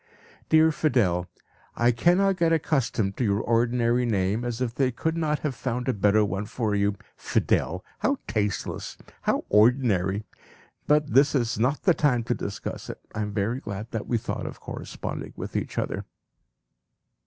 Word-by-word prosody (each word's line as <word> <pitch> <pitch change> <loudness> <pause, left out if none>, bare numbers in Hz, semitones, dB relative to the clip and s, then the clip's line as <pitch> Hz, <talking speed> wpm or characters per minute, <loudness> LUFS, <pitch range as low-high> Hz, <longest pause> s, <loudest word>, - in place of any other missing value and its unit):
"Dear 160 0 +6
Fidel! 110 - +1 0.5
I 120 +1 +3
cannot 180 +10 +3
get 165 -2 +2
accustomed 130 -10 0
to - - 0
your 100 -2 +2
ordinary 120 +1 +2
name, 105 -1 0
as 120 -1 -3
if 125 -3 -1
they 130 0 +2
could 160 +7 -2
not 155 -2 0
have 150 -3 -1
found 125 +1 -3
a 130 - +2
better 105 +1 +3
one 100 +1 -3
for 110 -3 -1
you! 100 0 +1 0.2
Fidel! 90 +2 0
How 275 +1 +1
tasteless! 105 -3 -2 0.2
How - - 0
ordinary! 105 -3 +3 0.6
But 150 0 +2
this 140 +3 +5
is 120 -5 0
not 130 +6 +1
the 180 - +5
time 130 -7 +2
to 120 - 0
discuss 100 -2 -5
it. - - -6
I 110 - -3
am 105 -1 -2
very 105 +5 -1
glad 105 -1 -6
that 115 -2 -4
we 120 - +1
thought - - -4
of - - -8
corresponding - - -6
with - - -7
each - - -3
other." - - -2
120 Hz, 165 wpm, -26 LUFS, 105-140 Hz, 0.6 s, Dear